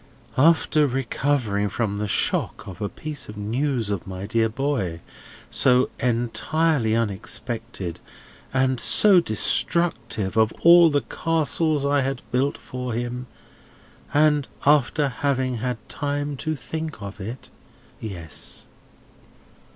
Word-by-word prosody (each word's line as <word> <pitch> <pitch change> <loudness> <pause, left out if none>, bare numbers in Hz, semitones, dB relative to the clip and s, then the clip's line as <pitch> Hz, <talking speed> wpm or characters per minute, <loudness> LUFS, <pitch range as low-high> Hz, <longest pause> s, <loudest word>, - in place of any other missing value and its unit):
"After 155 0 +4
recovering 125 -5 0
from 100 -3 -2
the 105 - -2
shock 100 - 0
of 95 +2 -9
a 100 - -1
piece 150 -6 -6
of 105 - -9
news 115 +1 -1
of 100 -3 -3
my 95 0 -6
dear 115 +2 +1
boy, 110 - -2 0.5
so 125 0 +3
entirely 120 +2 +1
unexpected, 115 -3 -3 0.5
and 130 -1 +1
so 150 - +6
destructive 115 - +1
of 110 0 +4
all 170 0 +8
the 145 -2 +1
castles 155 -2 0
I 140 0 +2
had 135 -1 -3
built 135 +3 +1
for 125 -1 -6
him; 120 +2 -4 0.8
and 150 -1 +3 0.2
after 145 0 +3
having 130 -1 -1
had 125 +1 -2
time 145 0 -3
to 155 +3 -2
think 160 -1 -6
of 100 0 -8
it; 115 +6 -8 0.5
yes." 90 -7 -5
125 Hz, 120 wpm, -23 LUFS, 110-145 Hz, 0.8 s, all